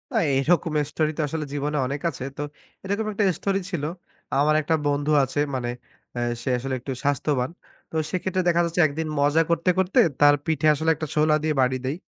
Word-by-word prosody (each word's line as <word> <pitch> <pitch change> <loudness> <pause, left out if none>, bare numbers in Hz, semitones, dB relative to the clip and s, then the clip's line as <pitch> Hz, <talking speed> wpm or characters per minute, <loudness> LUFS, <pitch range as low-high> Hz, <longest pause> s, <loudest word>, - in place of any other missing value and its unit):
আ - - +4 0.2
এরকম 165 +3 +1 0.2
story 155 0 0
তো - - 0
আসলে 155 +1 -3
জীবনে 145 +1 -2
অনেক 140 +2 -4
আছে। 135 - -7
তো - - -3 0.4
এরকম 200 +3 -2
একটা 205 - 0 0.2
story 195 -1 0
ছিল। 170 -6 -3 0.6
আমার 150 +2 +3
একটা 160 +2 +1
বন্ধু 145 +1 0
আছে 135 +2 -2 0.2
মানে 120 -2 -2 0.4
অ্যা 120 - -3 0.2
সে 120 - -3
আসলে 130 +2 -4
একটু 130 +3 -6
স্বাস্থ্যবান। 140 -2 0 0.4
তো - - -8 0.2
সেক্ষেত্রে 185 +1 -1
দেখা 170 0 +4
যাচ্ছে 170 +1 +1
একদিন 155 +2 -4
মজা 145 +3 +4
করতে, 170 +2 +1
করতে 190 0 +2 0.2
তার 145 0 +7
পিঠে 155 -2 +1
আসলে 160 +2 -1
একটা 155 - -5
সোলা 155 0 +4
দিয়ে 155 -1 +1
বাড়ি 130 0 +2
দেই। 135 - -1
150 Hz, 195 wpm, -24 LUFS, 140-170 Hz, 0.6 s, তার